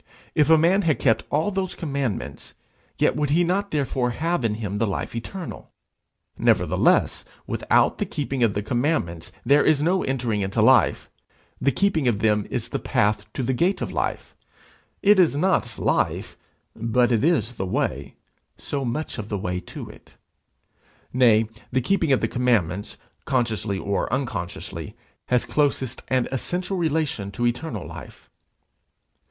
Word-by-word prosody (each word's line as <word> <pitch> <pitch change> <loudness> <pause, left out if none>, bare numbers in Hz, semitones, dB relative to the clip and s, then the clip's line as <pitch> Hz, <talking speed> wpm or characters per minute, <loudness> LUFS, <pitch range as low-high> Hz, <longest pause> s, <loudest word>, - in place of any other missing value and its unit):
If 150 0 +3
a 160 - +7
man 175 +5 +4
had 160 -6 +1
kept 115 -4 +2
all 155 +8 +1
those 190 -1 -2
commandments, 135 - -4 0.4
yet - - +2
would 150 -1 0
he 165 +4 +3
not 195 +4 0
therefore 135 -4 0
have 165 +4 -1
in 110 -2 +1
him 105 -2 -4
the 115 - +1
life 100 - -3
eternal; 175 +11 -7 0.7
nevertheless, - - +2 0.2
without - - +2
keeping 140 -4 -3
of 115 -4 +3
the 105 - -1
commandments 120 - -1
there 145 +1 +5
is 155 -2 +3
no 180 +5 +2
entering 120 -6 -1
into 95 0 -2
life; - - +4 0.5
the 140 - +3
keeping 160 -2 +1
of 115 -4 +2
them 105 0 +1
is - - -3
the - - -2
path 105 0 0
to 130 - -3
the 130 +2 0
gate 175 +10 +1
of - - -3
life; - - -3 0.7
it 205 -1 +6
is 170 -6 +4
not 145 -9 +1
life, - - 0 0.4
but 120 +2 +1
it 115 -2 +2
is 125 - +2
the 95 -5 -4
way 70 -6 -2 0.4
so 140 -1 -4
much 130 +2 -3
of 105 0 -6
the 105 - -1
way 90 -1 -2
to - - -9
it. - - -16 1.0
Nay, 115 -3 +4 0.2
the 130 - +2
keeping 165 +3 +1
of 135 - +3
the - - +1
commandments, 105 -7 0 0.3
consciously 115 -6 0
or 100 +2 -2
unconsciously, 120 -10 -4 0.3
has 125 -1 +2
closest 135 -4 0
and 130 -1 +1
essential 180 +8 -2
relation 155 - -1
to 110 +5 -2
eternal 120 - -2
life. - - -11
125 Hz, 155 wpm, -24 LUFS, 110-155 Hz, 1.0 s, a